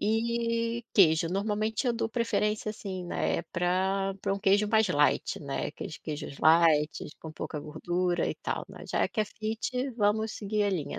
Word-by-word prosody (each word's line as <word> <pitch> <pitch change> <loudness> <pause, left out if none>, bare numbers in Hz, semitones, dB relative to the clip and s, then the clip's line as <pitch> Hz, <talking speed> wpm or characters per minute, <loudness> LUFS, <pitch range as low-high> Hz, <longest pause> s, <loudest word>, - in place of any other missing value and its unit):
e 230 +1 0
queijo. 165 -4 +5
Normalmente 210 +5 -1
eu 245 - +3
dou 230 - -1
preferência, 215 -2 0
assim, 195 -3 -6
né, 80 - -1
pra 190 +2 +1
pra 195 - 0
um - - -4
queijo 200 +1 +3
mais 220 0 +4
light, 150 -4 +2
né, 140 -2 -3
aqueles 155 - -7
queijos 150 -2 -6
lights, 155 -2 +4
com 160 - -8
pouca 155 - -5
gordura, 175 +4 -1
e - - -2
tal, - - -3
né. - - -11
Já - - 0
é - - +2
que 220 - -2
é - - +2
fit, 225 +5 -3
vamos 215 0 +1
seguir 210 0 -1
a 205 - +2
linha, 165 -7 -3
200 Hz, 180 wpm, -29 LUFS, 165-220 Hz, -, queijo